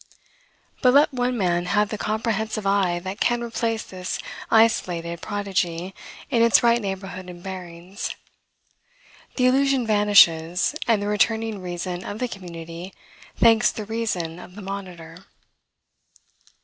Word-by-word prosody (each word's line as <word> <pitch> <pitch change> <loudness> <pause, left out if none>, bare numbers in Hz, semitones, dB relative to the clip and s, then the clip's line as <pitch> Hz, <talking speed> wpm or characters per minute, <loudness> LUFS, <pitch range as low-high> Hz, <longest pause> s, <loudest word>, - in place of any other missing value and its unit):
But 250 +1 +5
let 285 0 +5
one 250 0 0
man 175 -3 +1
have 210 +1 +2
the 215 - -4
comprehensive 220 -1 -2
eye 195 -3 +2
that 190 +3 -5
can 240 0 +1
replace 230 -1 -2
this 185 -1 -5 0.3
isolated 175 -7 +2
prodigy 190 -3 -2 0.4
in 235 -3 +3
its 230 0 +5
right 235 0 +4
neighborhood 190 -2 -5
and 175 -1 -11
bearings, 185 0 -6 1.2
the 250 - +2
illusion 270 0 +3
vanishes, 195 - +4
and 220 -3 +2
the - - -2
returning 220 0 0
reason 180 0 -4
of 205 - -6
the 250 - -1
community 170 -3 -8 0.4
thanks 225 0 +5
the 215 - -6
reason 195 -7 -3
of 180 0 -12
the 205 - -9
monitor. 185 -3 -8
200 Hz, 130 wpm, -23 LUFS, 180-225 Hz, 1.2 s, But